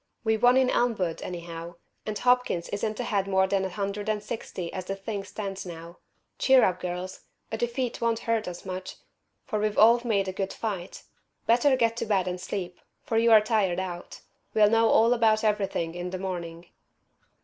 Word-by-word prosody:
We 220 Hz, -1 st, +2 dB
won 245 Hz, +3 st, +4 dB
in 260 Hz, -1 st, +3 dB
Elmwood, 200 Hz, -9 st, 0 dB
anyhow, 170 Hz, -1 st, -7 dB, 0.3 s
and 215 Hz, -1 st, -2 dB
Hopkins 250 Hz, -8 st, +1 dB
isn't 215 Hz, +2 st, -3 dB
ahead 205 Hz, -5 st, 0 dB
more 190 Hz, -1 st, +3 dB
than 190 Hz, 0 st, 0 dB
a 190 Hz, -, -2 dB
hundred 200 Hz, +2 st, -3 dB
and 210 Hz, -1 st, -1 dB
sixty 185 Hz, -7 st, -6 dB
as 185 Hz, -1 st, -5 dB
the 195 Hz, -, -3 dB
thing 200 Hz, 0 st, -5 dB
stands 195 Hz, -1 st, -5 dB
now. 170 Hz, -1 st, -9 dB, 0.4 s
Cheer 265 Hz, -1 st, +6 dB
up, 180 Hz, -1 st, +2 dB
girls. 180 Hz, +1 st, -5 dB, 0.3 s
A 220 Hz, -, -2 dB
defeat 240 Hz, +1 st, -2 dB
won't 230 Hz, -1 st, +1 dB
hurt 230 Hz, -3 st, 0 dB
us 175 Hz, +1 st, -7 dB
much, 185 Hz, 0 st, -6 dB, 0.5 s
for 220 Hz, -6 st, -2 dB
we've 210 Hz, 0 st, -1 dB
all 235 Hz, +3 st, +6 dB
made 200 Hz, -5 st, +1 dB
a 190 Hz, -, -3 dB
good 195 Hz, 0 st, -3 dB
fight. 195 Hz, -6 st, -5 dB, 0.4 s
Better 250 Hz, +4 st, +4 dB
get 230 Hz, -2 st, +2 dB
to -, -, -3 dB
bed 195 Hz, -3 st, +1 dB
and 180 Hz, 0 st, -3 dB
sleep, 180 Hz, -2 st, -5 dB, 0.2 s
for 225 Hz, -, +1 dB
you're 225 Hz, -2 st, +7 dB
tired 210 Hz, -5 st, +1 dB
out. 180 Hz, -2 st, -6 dB, 0.3 s
We'll 210 Hz, -1 st, +5 dB
know 225 Hz, 0 st, +4 dB
all 230 Hz, +2 st, +5 dB
about 225 Hz, -2 st, +3 dB
everything 195 Hz, -6 st, 0 dB
in 175 Hz, +1 st, -5 dB
the 185 Hz, -, -4 dB
morning." 175 Hz, -3 st, -5 dB
200 Hz, 185 wpm, -27 LUFS, 180-225 Hz, 0.5 s, you're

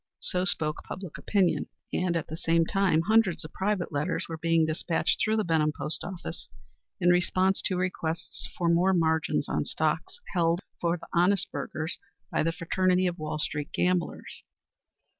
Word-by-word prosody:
So 180 Hz, 0 st, 0 dB
spoke 155 Hz, -5 st, +1 dB
public 185 Hz, -3 st, -7 dB
opinion, 195 Hz, -4 st, +1 dB, 0.3 s
and, 180 Hz, -2 st, +1 dB
at 165 Hz, -, -3 dB
the 160 Hz, -, -6 dB
same 165 Hz, 0 st, +2 dB
time, 185 Hz, -3 st, +2 dB
hundreds 215 Hz, -5 st, +3 dB
of 155 Hz, -, -10 dB
private 190 Hz, -3 st, -1 dB
letters 150 Hz, +4 st, -1 dB
were 165 Hz, -1 st, -6 dB
being 165 Hz, 0 st, +3 dB
despatched 160 Hz, +1 st, 0 dB
through 220 Hz, 0 st, +2 dB
the 215 Hz, -, +2 dB
Benham 160 Hz, -3 st, +2 dB
Post 150 Hz, +1 st, 0 dB
Office 175 Hz, -, -7 dB, 0.5 s
in 175 Hz, -, +3 dB
response 185 Hz, +2 st, +2 dB
to 185 Hz, -, +1 dB
requests 165 Hz, -2 st, -3 dB
for 175 Hz, -, 0 dB
more 175 Hz, +3 st, +4 dB
margins 160 Hz, -1 st, +1 dB
on -, -, 0 dB
stocks -, -, -1 dB
held 170 Hz, -1 st, +2 dB, 0.2 s
for 170 Hz, 0 st, +1 dB
the 165 Hz, -, -12 dB
honest 180 Hz, +2 st, +3 dB
burghers 160 Hz, +2 st, -4 dB, 0.3 s
by -, -, +1 dB
the 165 Hz, -, +1 dB
fraternity 185 Hz, +2 st, +1 dB
of 180 Hz, 0 st, -1 dB
Wall 155 Hz, 0 st, -3 dB
street 150 Hz, -1 st, -3 dB
gamblers. 180 Hz, -1 st, -1 dB
170 Hz, 165 wpm, -28 LUFS, 160-185 Hz, 0.5 s, more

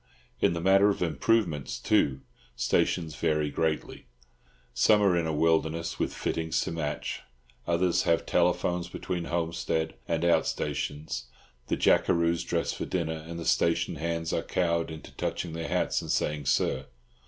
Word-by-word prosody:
In -, -, +3 dB
the 85 Hz, -, -3 dB
matter 95 Hz, +3 st, +5 dB
of 100 Hz, -, 0 dB
improvements, 85 Hz, -, 0 dB
too, 70 Hz, -1 st, +2 dB, 0.3 s
stations 80 Hz, -4 st, +1 dB
vary 75 Hz, -1 st, 0 dB
greatly. 80 Hz, -4 st, -2 dB, 0.7 s
Some 105 Hz, -, +5 dB
are 95 Hz, -3 st, +4 dB
in 85 Hz, -2 st, +1 dB
a -, -, 0 dB
wilderness, 80 Hz, +1 st, +1 dB
with -, -, 0 dB
fittings 80 Hz, -1 st, -1 dB
to -, -, -3 dB
match; 75 Hz, -3 st, -3 dB, 0.5 s
others 85 Hz, +1 st, +2 dB
have 85 Hz, -, +1 dB
telephones 90 Hz, 0 st, +1 dB
between 90 Hz, -1 st, -4 dB
homestead 80 Hz, -1 st, -1 dB
and 85 Hz, 0 st, 0 dB
out 85 Hz, -, +3 dB
stations, 75 Hz, -4 st, -3 dB, 0.4 s
the -, -, 0 dB
jackeroos 85 Hz, 0 st, +3 dB
dress 85 Hz, -1 st, -1 dB
for -, -, -4 dB
dinner, 80 Hz, -3 st, -2 dB
and 85 Hz, 0 st, -6 dB
the 85 Hz, -, -5 dB
station 85 Hz, 0 st, +1 dB
hands 85 Hz, +1 st, -2 dB
are -, -, +1 dB
cowed 85 Hz, -2 st, 0 dB
into 80 Hz, -1 st, -9 dB
touching 85 Hz, -2 st, -3 dB
their 80 Hz, 0 st, -4 dB
hats -, -, 0 dB
and -, -, -8 dB
saying 75 Hz, -2 st, -1 dB
"Sir." 65 Hz, 0 st, +1 dB
85 Hz, 155 wpm, -28 LUFS, 80-85 Hz, 0.7 s, matter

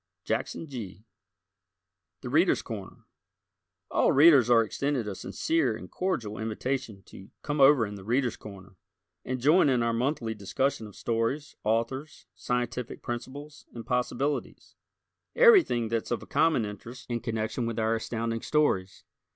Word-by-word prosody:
Jackson 115 Hz, +8 st, -3 dB
Gee. 110 Hz, -, -8 dB, 1.2 s
"The -, -, -6 dB
Readers' -, -, +3 dB
Corner" -, -, -8 dB, 0.9 s
All -, -, +3 dB
Readers 140 Hz, -4 st, +6 dB
are 115 Hz, -1 st, +6 dB
extended 135 Hz, 0 st, -2 dB
a 105 Hz, -, -3 dB
sincere 325 Hz, -, -1 dB
and -, -, -11 dB
cordial 120 Hz, -, -2 dB
invitation 110 Hz, -1 st, -3 dB
to 95 Hz, +1 st, -14 dB
"come 145 Hz, -1 st, -1 dB
over 135 Hz, -4 st, +6 dB
in 105 Hz, -, -7 dB
'The 100 Hz, -2 st, -9 dB
Readers' 120 Hz, +2 st, 0 dB
Corner'" 95 Hz, -3 st, -12 dB, 0.5 s
and 130 Hz, 0 st, -3 dB
join 150 Hz, +5 st, +4 dB
in 125 Hz, -3 st, +2 dB
our 115 Hz, 0 st, +1 dB
monthly 120 Hz, -1 st, -1 dB
discussion 110 Hz, +3 st, -2 dB
of 105 Hz, -, -14 dB
stories, 120 Hz, +6 st, -2 dB
authors, 115 Hz, +7 st, -2 dB
scientific 125 Hz, +3 st, -3 dB
principles 140 Hz, +5 st, -7 dB
and 115 Hz, -, -7 dB
possibilities 125 Hz, +3 st, -2 dB, 0.6 s
everything 380 Hz, -, +5 dB
that's 115 Hz, -1 st, -2 dB
of 120 Hz, -, -3 dB
common 160 Hz, -9 st, +2 dB
interest 115 Hz, +5 st, -9 dB
in 120 Hz, -1 st, -2 dB
connection 115 Hz, 0 st, -3 dB
with 115 Hz, -, -4 dB
our 110 Hz, 0 st, +1 dB
Astounding 115 Hz, 0 st, -3 dB
Stories. 95 Hz, -12 st, 0 dB
120 Hz, 140 wpm, -28 LUFS, 110-140 Hz, 1.2 s, Readers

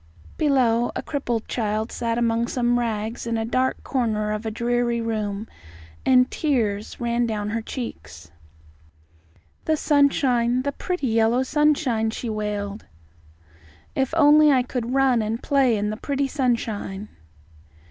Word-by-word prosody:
Below, 245 Hz, -5 st, +2 dB
a -, -, -3 dB
crippled 240 Hz, -6 st, -3 dB
child 220 Hz, -1 st, -2 dB
sat 230 Hz, -1 st, -2 dB
among 235 Hz, 0 st, +1 dB, 0.3 s
rags 225 Hz, -1 st, -2 dB
in 230 Hz, -1 st, 0 dB
a 225 Hz, -, -1 dB
dark 255 Hz, +3 st, 0 dB
corner 215 Hz, -5 st, -1 dB
of 215 Hz, +1 st, -3 dB
a -, -, 0 dB
dreary 235 Hz, +1 st, 0 dB
room, 215 Hz, -2 st, -3 dB, 0.6 s
and 255 Hz, -1 st, +4 dB
tears 220 Hz, -9 st, -1 dB
ran 235 Hz, 0 st, 0 dB
down 210 Hz, -2 st, -3 dB
her 230 Hz, +1 st, -1 dB
cheeks. 80 Hz, -, -8 dB, 1.3 s
"The 315 Hz, -1 st, +2 dB
sunshine, 260 Hz, -5 st, +2 dB
the 285 Hz, -, -1 dB
pretty 360 Hz, +1 st, -3 dB
yellow 230 Hz, +2 st, +2 dB
sunshine!" 275 Hz, -6 st, +1 dB
she 230 Hz, +1 st, -4 dB
wailed. 210 Hz, -1 st, -4 dB, 1.1 s
"If 265 Hz, -1 st, 0 dB
only 300 Hz, 0 st, +6 dB
I 255 Hz, -2 st, +3 dB
could 250 Hz, 0 st, -3 dB
run 265 Hz, -4 st, +3 dB
and 220 Hz, +2 st, -3 dB
play 265 Hz, -5 st, +3 dB
in 210 Hz, +1 st, -1 dB
the 215 Hz, -, -5 dB
pretty 280 Hz, +2 st, -1 dB
sunshine!" 225 Hz, -7 st, -2 dB
235 Hz, 135 wpm, -23 LUFS, 220-260 Hz, 1.3 s, only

